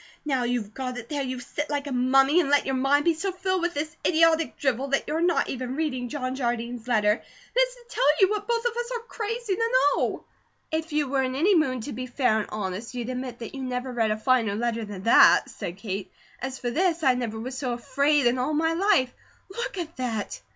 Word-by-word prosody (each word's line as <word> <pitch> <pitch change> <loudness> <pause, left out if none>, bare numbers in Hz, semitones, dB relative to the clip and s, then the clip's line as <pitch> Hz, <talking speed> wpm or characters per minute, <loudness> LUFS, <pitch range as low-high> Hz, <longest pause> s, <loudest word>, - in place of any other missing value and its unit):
Now 265 -4 0
you've 240 -4 -2
got 255 -1 -4
it, 235 -1 -8
there 290 -2 -2
you 255 -1 -3
sit 295 +4 -4
like 290 -1 -2
a 285 - -5
mummy 270 +5 +4
and 310 -6 +1
let 290 0 +4
your 270 - -1
mind 275 +3 +2
be 340 - +4
so 375 +5 -2
filled 375 0 -1
with 345 -1 -1
this 305 +2 -3
idiotic 325 -1 +3
drivel 265 -1 0
that 275 0 +1
you're 315 +2 -1
not 345 0 +2
ever 255 -1 -4
reading 255 -2 -2
John 255 -2 -3
Jardine's 240 -2 -3
letter 210 -4 +3
that - - -3
is - - -14
to 485 -1 -18
tell 380 - 0
you 385 +1 +5
what 415 -1 -2
both 470 0 0
of 475 -1 0
us 480 +1 -3
are 470 - -4
crazy 450 -2 -3
to 460 0 0 0.3
know." - - -1 0.5
"If 320 +1 -2
you 300 -1 +1
were 270 0 +1
in 260 0 -1
any 355 +9 +3
mood 255 -7 +1
to 285 - -5
be 255 +2 -5
fair 245 -3 +1
and 215 - -3
honest, 210 +3 -5
you'd 240 0 -4
admit 255 -1 -4
that 230 - -8
you 270 - -6
never 255 0 -3
read 225 -2 +1
a 215 - 0
finer 225 -3 +2
letter 230 0 -1
than 200 -2 -8
THAT," 230 - +6
said 175 +1 -6
Kate. 195 -2 -5 0.3
"As 265 +1 -4
for 245 - -3
THIS, 340 +2 +1
I 265 -3 +5
never 235 -3 -3
was 255 +3 -5
so 260 -2 -2
AFRAID 280 +4 +1
in 240 +1 +3
all 285 +5 0
my 325 +2 +2
life. 345 -8 +2 0.4
Look 475 -4 -4
at 335 -4 -5
that!" 230 -5 -3
265 Hz, 235 wpm, -26 LUFS, 245-320 Hz, 0.5 s, THAT